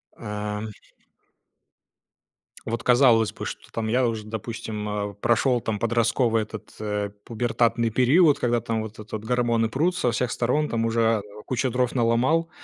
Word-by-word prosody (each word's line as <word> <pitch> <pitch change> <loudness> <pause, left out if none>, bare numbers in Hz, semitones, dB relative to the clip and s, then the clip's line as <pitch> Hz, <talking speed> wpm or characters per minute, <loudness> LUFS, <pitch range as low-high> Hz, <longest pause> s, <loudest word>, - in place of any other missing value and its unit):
Ам. 105 +1 -4 2.0
Вот 115 +1 -3
казалось 120 -3 +5
бы, - - -7
что, - - -8
там, 110 -1 -3
я 125 +2 +2
уже, 110 -2 -3
допустим, 110 -1 -5
э, 105 -1 -3
прошел 120 +1 +2
там 105 -2 -2
подростковый 115 0 +2
этот, 110 0 -10
э, 105 -1 -2
пубертатный 115 0 0
период, 145 - +4
когда, 120 -1 +1
там, 110 -1 -2
вот 110 0 -8
этот 105 0 -6
гормоны 115 -1 +1
прут 170 +9 +1
со 120 - +1
всех 120 +2 -1
сторон, 145 +6 +1
там 115 -1 0
уже 115 -1 +2 0.2
кучу 130 +1 -1
дров 125 0 0
наломал, 125 +8 +2
115 Hz, 145 wpm, -25 LUFS, 110-125 Hz, 2.0 s, казалось